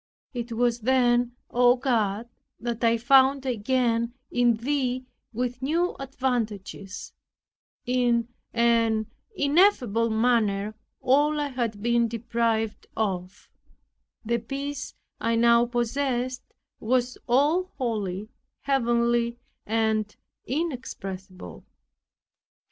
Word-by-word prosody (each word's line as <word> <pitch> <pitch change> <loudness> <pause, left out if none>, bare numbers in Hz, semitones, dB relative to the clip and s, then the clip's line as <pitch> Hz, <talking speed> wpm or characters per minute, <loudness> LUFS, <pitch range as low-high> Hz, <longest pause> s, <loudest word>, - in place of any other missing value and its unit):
It 240 -1 -5
was 240 +1 +1
then, 245 0 +2 0.2
O 245 0 +5
God, 230 -4 0 0.3
that 235 0 -4
I 230 0 +4
found 265 +3 +4
again 235 0 0 0.2
in 240 -1 +3
Thee 255 +1 -1 0.3
with 245 +1 -3
new 335 +6 0
advantages, 225 -8 -3 0.7
in 240 -2 +2 0.2
an 230 -2 +2 0.2
ineffable 280 - +3
manner, 220 -3 +1 0.3
all 295 +3 +3
I 290 -1 -1
had 230 -5 -3
been 235 0 +3
deprived 225 -1 -1
of; 190 -3 -3 0.8
the 235 +1 +1
peace 275 +3 -5 0.2
I 230 0 +1
now 235 +1 +5
possessed 250 +1 -2 0.3
was 250 +2 0
all 290 +9 +3
holy, 210 -6 -2 0.4
heavenly 235 -3 +1 0.3
and 220 -1 0 0.3
inexpressible. 195 - -5
235 Hz, 90 wpm, -26 LUFS, 225-255 Hz, 0.8 s, O